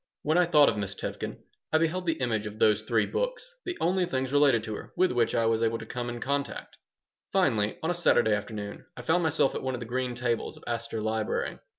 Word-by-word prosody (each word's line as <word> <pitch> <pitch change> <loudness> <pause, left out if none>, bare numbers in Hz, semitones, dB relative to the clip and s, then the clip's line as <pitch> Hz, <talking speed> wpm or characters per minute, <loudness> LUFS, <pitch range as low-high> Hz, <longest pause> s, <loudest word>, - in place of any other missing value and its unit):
Whenever 170 +3 +3
I - - -14
thought 150 -4 +7
of - - -2
Miss 100 -1 -3
Tevkin - - -5 0.3
I 160 - +5
beheld 170 +3 0
the 165 - 0
image 110 -4 0
of 105 +1 -8
those 110 -1 +4
three 110 -1 +1
books - - -2 0.2
the 360 -1 -3
only 180 +1 +1
things 130 -3 -2
related 140 -6 +4
to 110 - -4
her - - -8
with 185 0 +3
which 120 -2 +1
I 115 - +2
was 115 0 +2
able 115 0 +1
to 110 - -8
come 120 +2 -4
in 120 0 -5
contact 140 +3 -3 0.6
Finally, 115 - +2
on 160 - +1
a - - +1
Saturday 120 -10 +3
afternoon, 105 +2 -5
I - - -7
found 175 +2 +2
myself 160 -4 +2
at - - -3
one 130 -1 -2
of - - -6
the 120 - -6
green 125 +1 -2
tables 120 -2 -2
of - - -16
Astor 115 -1 -3
Library. 110 0 -1
120 Hz, 235 wpm, -28 LUFS, 110-160 Hz, 0.6 s, thought